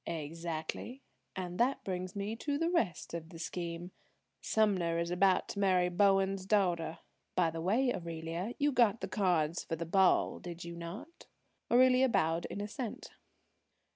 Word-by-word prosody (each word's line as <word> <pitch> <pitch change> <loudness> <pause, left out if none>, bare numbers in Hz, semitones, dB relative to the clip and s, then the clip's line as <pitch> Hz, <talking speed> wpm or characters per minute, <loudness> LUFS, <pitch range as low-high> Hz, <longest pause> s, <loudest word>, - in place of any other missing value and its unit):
"Exactly. 165 - -5 0.3
And 180 -1 -5
that 255 +3 +2
brings 185 0 -4
me 200 +2 -3
to 285 +4 -2
the 330 +3 0
rest 210 - -1
of 165 -1 -5
the 165 - -10
scheme. 170 +1 -5 0.5
Sumner 190 -6 +2
is 170 +1 -1
about 185 +1 +3
to - - -4
marry 185 -2 +3
Bowen's 195 +1 +3
daughter. 175 -6 +1 0.4
By 170 -3 +3
the 165 0 -5
way, 240 +8 +2
Aurelia, 170 +5 -4
you 290 0 +2
got 230 -4 +3
the - - -2
cards 175 -5 +1
for 165 - -3
the 170 +1 -4
ball, 190 +2 +3
did 175 -1 -7
you 170 0 -7
not?" 195 - -9 0.4
Aurelia 255 +1 +5
bowed 165 -6 +1
in 200 - -5
assent. 215 +3 -5
185 Hz, 155 wpm, -33 LUFS, 170-215 Hz, 0.5 s, Aurelia